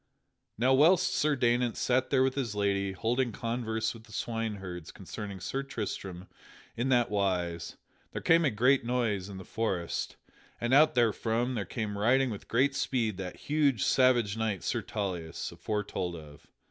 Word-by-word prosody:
Now 125 +4 +3
whilst 180 +7 +5
Sir 150 -4 +2
Daynant 120 -2 +1
sat 130 +1 +1
there 130 -2 +4
with 130 0 +1
his 125 -7 -3
lady, 100 -1 0
holding 120 +6 0
converse 115 0 -2
with 115 -1 -13
the - - -17
swineherds 100 -7 -4
concerning 100 -2 -7
Sir 135 +10 -3
Tristram 100 -7 -5 0.5
in 120 +3 -1
that 120 -3 +3
wise, 90 -4 -1 0.3
there - - -4
came 165 +1 +4
a 150 - +3
great 125 +4 +3
noise 115 -6 -1
in 100 - -7
the 95 - -9
forest, 95 -7 -2 0.4
and 120 +2 0
out 155 +2 +6
therefrom 120 +1 +1
there 105 -5 -2
came 105 +1 -4
riding 125 +4 +3
with 105 - -8
great 130 +4 +2
speed 115 -7 -1
that 95 -2 -6
huge 145 -8 +2
savage 120 -5 +3
knight 110 -4 -2
Sir - - -1
Tauleas 90 -6 -4
aforetold 100 -4 -3
of. 75 -3 -12
115 Hz, 160 wpm, -30 LUFS, 100-130 Hz, 0.5 s, out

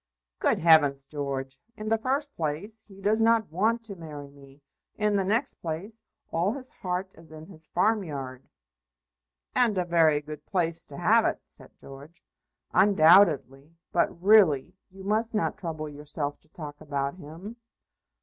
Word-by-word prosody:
"Good - - +2
heavens, 145 -4 +5
George! 135 -2 -5 0.2
In 215 - -6
the 225 - +3
first 275 +5 -1
place 170 +8 -2
he 195 -2 -15
does 215 +3 +2
not 225 -4 +3
want 225 +7 +1
to 210 -3 -7
marry 150 -4 -9
me. 140 0 -18 0.3
In 210 -1 +1
the 195 - +2
next 225 +8 0
place 180 +8 -5 0.3
all 175 +6 +1
his 260 -1 -3
heart 185 0 -4
is 165 -1 -17
in 155 0 -10
his 160 -4 -5
farmyard." 145 - -2 1.0
"And 230 -5 +2
a 180 - +1
very 165 -3 +3
good 150 0 -9
place 165 -3 -1
to - - -10
have - - +4
it," - - 0
said - - -15
George. 140 +5 -13 0.5
"Undoubtedly. 160 -6 +4 0.2
But, 170 - 0
really, 185 -7 +5 0.2
you 190 +1 -13
must 220 +3 0
not 210 - 0
trouble 155 -3 -5
yourself 145 0 -5
to 155 - -25
talk 150 -2 -9
about 140 0 -3
him." 180 +8 -10
165 Hz, 155 wpm, -27 LUFS, 150-205 Hz, 1.0 s, heavens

